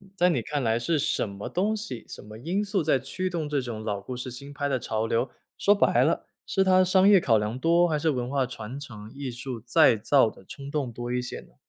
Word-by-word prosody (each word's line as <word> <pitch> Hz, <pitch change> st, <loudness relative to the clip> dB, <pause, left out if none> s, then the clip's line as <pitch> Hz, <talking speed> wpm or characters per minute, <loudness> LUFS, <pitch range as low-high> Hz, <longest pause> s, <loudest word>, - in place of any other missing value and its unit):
在 180 Hz, -2 st, +4 dB
你 145 Hz, -9 st, +1 dB
看 145 Hz, +4 st, -3 dB
来 115 Hz, 0 st, +1 dB
是 155 Hz, +7 st, 0 dB
什 145 Hz, -5 st, 0 dB
么 100 Hz, +1 st, -7 dB
东 205 Hz, +5 st, 0 dB
西、 130 Hz, -, -6 dB
什 -, -, -9 dB
么 105 Hz, +1 st, -11 dB
因 175 Hz, -, -1 dB
素 200 Hz, -2 st, 0 dB
在 150 Hz, -3 st, +3 dB
驱 185 Hz, +8 st, -3 dB
动 165 Hz, -4 st, -3 dB
这 145 Hz, -2 st, 0 dB
种 115 Hz, -3 st, -6 dB
老 105 Hz, -2 st, -3 dB
故 125 Hz, -, -6 dB
事 125 Hz, +1 st, -5 dB
新 140 Hz, +3 st, -9 dB
拍 145 Hz, 0 st, -2 dB
的 135 Hz, -2 st, 0 dB
潮 110 Hz, -1 st, -2 dB
流， 115 Hz, +3 st, 0 dB, 0.3 s
说 205 Hz, -, +4 dB
白 200 Hz, -, +3 dB
了， -, -, 0 dB, 0.2 s
是 195 Hz, -, +1 dB
它 185 Hz, -1 st, +5 dB
商 185 Hz, +1 st, +4 dB
业 200 Hz, -2 st, +7 dB
考 115 Hz, -9 st, +3 dB
量 105 Hz, +3 st, -2 dB
多， 170 Hz, +4 st, +4 dB
还 155 Hz, -3 st, 0 dB
是 160 Hz, -, +1 dB
文 125 Hz, -4 st, -1 dB
化 135 Hz, -1 st, +1 dB
传 125 Hz, +1 st, -7 dB
承、 110 Hz, -6 st, -10 dB
艺 140 Hz, -1 st, -5 dB
术 120 Hz, -1 st, -6 dB
再 120 Hz, -1 st, +5 dB
造 120 Hz, +2 st, +4 dB
的 -, -, -17 dB
冲 140 Hz, +8 st, -9 dB
动 145 Hz, -5 st, -2 dB
多 120 Hz, +1 st, -5 dB
一 125 Hz, -, 0 dB
些 125 Hz, -, -6 dB
呢？ -, -, -21 dB
135 Hz, 270 characters per minute, -26 LUFS, 115-165 Hz, 0.3 s, 业